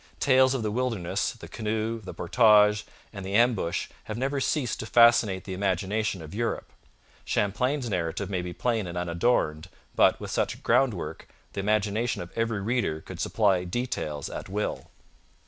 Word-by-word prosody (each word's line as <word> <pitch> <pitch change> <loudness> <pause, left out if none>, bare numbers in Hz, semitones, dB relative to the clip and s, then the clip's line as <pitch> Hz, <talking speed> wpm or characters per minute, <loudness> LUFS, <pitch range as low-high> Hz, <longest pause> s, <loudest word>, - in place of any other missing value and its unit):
Tales 130 -1 +4
of 125 - -2
the 105 - -1
wilderness, 115 -7 -1
the - - -11
canoe, 110 +1 -2
the 95 - -8
portage, 105 +1 +4 0.3
and 100 -2 -7
the 95 +1 -3
ambush 115 -7 +2 0.2
have 110 - -5
never 135 +3 -1
ceased 130 -5 0
to 110 - -5
fascinate 115 -6 +5
the 95 - -6
imagination 95 0 -1
of 80 - -10
Europe. 115 +2 -3 0.5
Champlain's 125 +6 0
narrative 90 -1 -2
may 95 -2 -2
be 90 0 -5
plain 115 0 -1
and 85 0 -5
unadorned, 85 -3 0 0.3
but, - - +4
with - - -6
such - - 0
a - - -14
groundwork, 90 - 0 0.3
the - - -4
imagination 105 +3 0
of 85 - -12
every 115 -3 -1
reader 110 -7 0
could - - -10
supply 100 -5 +2
details 90 - -3
at - - -7
will. 105 +2 -3
105 Hz, 165 wpm, -27 LUFS, 95-120 Hz, 0.5 s, fascinate